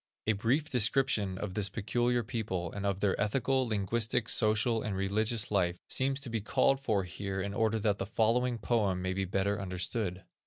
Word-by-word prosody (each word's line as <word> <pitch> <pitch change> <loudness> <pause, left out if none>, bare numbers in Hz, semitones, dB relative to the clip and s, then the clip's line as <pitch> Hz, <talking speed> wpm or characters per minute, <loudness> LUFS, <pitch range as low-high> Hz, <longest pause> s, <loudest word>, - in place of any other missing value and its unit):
A 110 - +3
brief 120 +9 0
description 115 -6 +1
of 95 -1 -4
this 100 0 +2
peculiar 120 +4 0
people, 100 -7 -3
and 100 0 -3
of 100 0 -2
their 100 -2 +2
ethical, 130 +4 +1
linguistic, 115 +3 0
social, 110 +1 +3
and 100 -3 -3
religious 105 +3 +1
life, 90 -3 +1
seems 135 +1 +1
to 130 - -7
be 115 -2 -1
called 135 +6 +2
for 110 -8 0
here 95 +2 -5
in 100 +1 -3
order 110 +1 +1
that 105 -2 0
the 95 - -3
following 120 +3 +1
poem 100 -5 0
may 95 0 -1
be 95 +1 -1
the - - -11
better 100 +2 0
understood. 95 0 -3
105 Hz, 190 wpm, -31 LUFS, 95-120 Hz, -, A